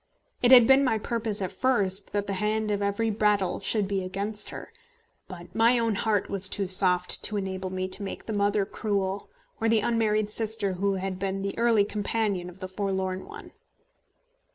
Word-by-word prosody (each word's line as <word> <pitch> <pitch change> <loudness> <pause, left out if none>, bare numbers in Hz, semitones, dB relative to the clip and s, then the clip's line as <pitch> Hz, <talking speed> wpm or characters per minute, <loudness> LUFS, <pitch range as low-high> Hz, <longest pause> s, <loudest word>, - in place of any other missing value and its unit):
It 245 - +3
had 245 -3 +9
been 270 +3 +5
my 240 -5 +1
purpose 220 -2 -2
at 185 - -4
first 200 -3 0
that 205 -1 -2
the 200 - -3
hand 215 +2 -1
of 205 0 -1
every 205 +3 -1
Brattle 205 -3 0
should 210 -3 +1
be 195 -1 -2
against 200 +3 -3
her; - - -10 0.5
but 180 -2 -11
my 230 +2 +3
own 230 -2 0
heart 205 0 0
was 195 -1 +2
too 200 -1 -2
soft 180 -1 +4
to 210 - -2
enable 190 -1 -4
me 185 0 -3
to 190 - +2
make 195 - -6
the 220 - -4
mother 205 0 +1
cruel, 200 -1 -3 0.3
or 225 - 0
the 225 -1 +3
unmarried 215 -2 0
sister 215 -3 +1
who 195 +2 -1
had 190 0 -4
been 195 0 -3
the 195 - -3
early 230 -3 +3
companion 205 -3 -2
of 180 +2 -16
the 185 - -4
forlorn 190 -1 -3
one. - - -11
200 Hz, 190 wpm, -26 LUFS, 190-220 Hz, 0.5 s, had